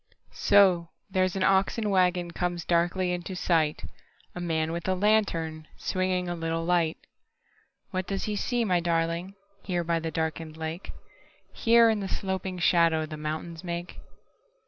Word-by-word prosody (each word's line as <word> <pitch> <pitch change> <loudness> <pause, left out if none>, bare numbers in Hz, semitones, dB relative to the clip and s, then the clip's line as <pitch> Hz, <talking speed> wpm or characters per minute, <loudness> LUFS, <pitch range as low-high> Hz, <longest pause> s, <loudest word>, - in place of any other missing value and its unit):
So, 185 -4 +4 0.2
there's 185 0 +1
an 190 - 0
oxen 195 +4 +2
wagonComes 180 -2 0
darkly 175 +2 +1
into 180 +1 -4
sight:A 165 0 -2
man 160 -2 -1
with 170 +1 -4
a 185 - +2
lantern, 170 -6 +1
swingingA 185 -1 -1
little 165 -1 -2
light. 170 -2 +2 0.9
What 185 -1 -2
does 195 -1 -2
he 210 - -2
see, 240 +3 0
my 180 -4 +2
darlingHere 175 +2 -2
by 165 0 +1
the 165 0 -3
darkened 160 0 -3
lake? 160 +3 -5 0.6
Here, 230 0 +5
in 215 - -1
the 195 - -3
sloping 190 -1 -3
shadowThe 165 -3 +2
mountains 155 +2 -5
make? 175 0 -5
175 Hz, 130 wpm, -27 LUFS, 165-190 Hz, 0.9 s, Here